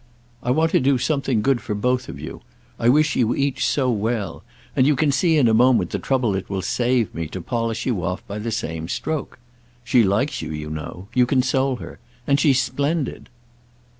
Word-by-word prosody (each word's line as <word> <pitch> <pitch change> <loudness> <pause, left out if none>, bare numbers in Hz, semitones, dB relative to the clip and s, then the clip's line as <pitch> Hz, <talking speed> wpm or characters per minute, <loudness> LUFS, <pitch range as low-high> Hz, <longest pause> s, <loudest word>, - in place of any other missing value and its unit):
I 125 - -3
want 160 +5 +2
to - - +4
do 135 0 +3
something 135 -5 0
good 135 -3 +2
for 105 - -3
both 125 +4 0
of 70 - -8
you—I 115 +9 -5
wish 150 +3 +3
you 120 -1 +2
each 140 -1 0
so 125 +2 +1
well; 110 -4 -2 0.3
and 130 - +4
you 150 - +4
can 145 +2 +2
see 160 +3 +2
in 135 -5 +4
a 110 - +3
moment 125 +2 +4
the - - -2
trouble 125 -6 0
it 95 - -4
will 95 -2 -2
save 120 +1 +1
me 80 -1 -4
to 95 - -6
polish 115 +3 -2
you 110 -9 -1
off 90 +2 -3
by 100 +1 -6
the 115 +2 -3
same 80 -8 -3
stroke. 155 - -3 0.5
She 120 +1 +4
likes 110 +9 0
you, 80 - -5
you 75 0 -5
know. 80 +5 -7
You 125 -1 +4
console 130 0 +1
her. - - -10 0.3
And 140 0 +2
she's 140 -3 +4
splendid." 145 +1 -2
125 Hz, 200 wpm, -22 LUFS, 105-135 Hz, 0.5 s, to